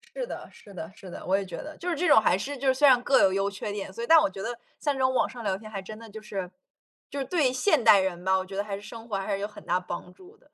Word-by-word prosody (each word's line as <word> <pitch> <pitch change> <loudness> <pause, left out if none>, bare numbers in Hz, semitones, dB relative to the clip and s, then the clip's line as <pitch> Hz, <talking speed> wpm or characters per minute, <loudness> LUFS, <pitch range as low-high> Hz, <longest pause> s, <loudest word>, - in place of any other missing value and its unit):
是 - - -2
的， - - -8
是 200 - -16
的， 165 -2 -6
是 190 -3 -11
的， - - -8
我 190 - +2
也 200 - -3
觉 175 -2 -7
得。 305 - -8
就 360 - -4
是 335 - 0
这 345 +3 0
种 220 -7 +7
还 185 - +3
是 280 +6 -4
就 270 +1 +1
是 260 - +5
虽 285 +2 +5
然 250 -2 +6
各 275 - +4
有 190 - +4
优 195 +1 0
缺 205 +1 -5
点， 200 -2 -5
所 230 - -7
以 235 - -3
但 325 - +8
我 300 - +4
觉 195 0 -8
得 230 +3 -4 0.2
像 290 -2 0
这 - - -6
种 260 0 +3
网 - - +2
上 240 -2 -9
聊 190 -2 0
天， 215 +1 -11
还 195 -3 -5
真 215 +3 -9
的 225 -1 -11
就 215 +1 -9
是， 195 -4 -5 0.6
就 285 - -4
是 270 - -2
对 280 -3 +2
现 265 - +2
代 215 -3 +8
人 180 -2 -2
吧， 190 0 +3
我 185 - -3
觉 195 - -9
得 200 - 0
还 200 -1 -4
是 - - -11
生 225 +2 -10
活 200 - -1
上 195 - -4
还 205 - -1
是 195 - -1
有 205 - -1
很 210 - -14
大 180 +1 +2
帮 180 0 -6
助 380 - -17
的。 - - -29
215 Hz, 375 characters per minute, -27 LUFS, 195-260 Hz, 0.6 s, 但